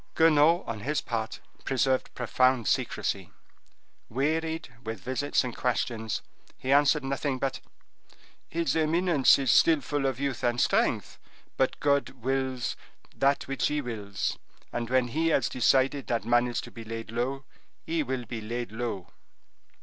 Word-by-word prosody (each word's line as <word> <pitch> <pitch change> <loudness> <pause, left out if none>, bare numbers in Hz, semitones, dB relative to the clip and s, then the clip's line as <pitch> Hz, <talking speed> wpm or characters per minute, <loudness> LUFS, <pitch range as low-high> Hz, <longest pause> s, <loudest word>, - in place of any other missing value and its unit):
Guenaud, 160 +1 +5
on 115 -2 -4
his 145 +8 -1
part, 110 -2 -4 0.2
preserved 130 0 +1
profound 130 -1 +2
secrecy; - - -1 0.8
wearied 160 +3 -1
with 110 -2 -5
visits 130 +10 0
and 125 -2 -5
questions, 115 -3 -1 0.3
he 130 - -3
answered 145 +1 +4
nothing 135 0 -1
but 135 0 -2 0.9
"his 165 -4 0
eminence 160 -2 +4
is 135 -4 +2
still 160 +4 +5
full 140 +1 -1
of 130 -2 -2
youth 140 -3 -2
and 120 0 +1
strength, - - +1 0.4
but 130 - 0
God 140 -1 +2
wills 130 0 -1 0.4
that 140 +1 +2
which 135 0 0
He 150 - 0
wills, 105 -7 -3 0.3
and 120 -1 -3
when 130 -1 +2
He 160 +6 0
has 140 -6 +3
decided 135 +2 +2
that 115 -2 -1
man 120 +1 +3
is 120 - -2
to - - -10
be 115 - -9
laid 115 0 -6
low, 130 +4 -2 0.4
he 165 0 0
will 130 -3 -3
be 115 -1 -5
laid 120 +1 -4
low." 110 -5 -4
130 Hz, 150 wpm, -28 LUFS, 120-145 Hz, 0.9 s, Guenaud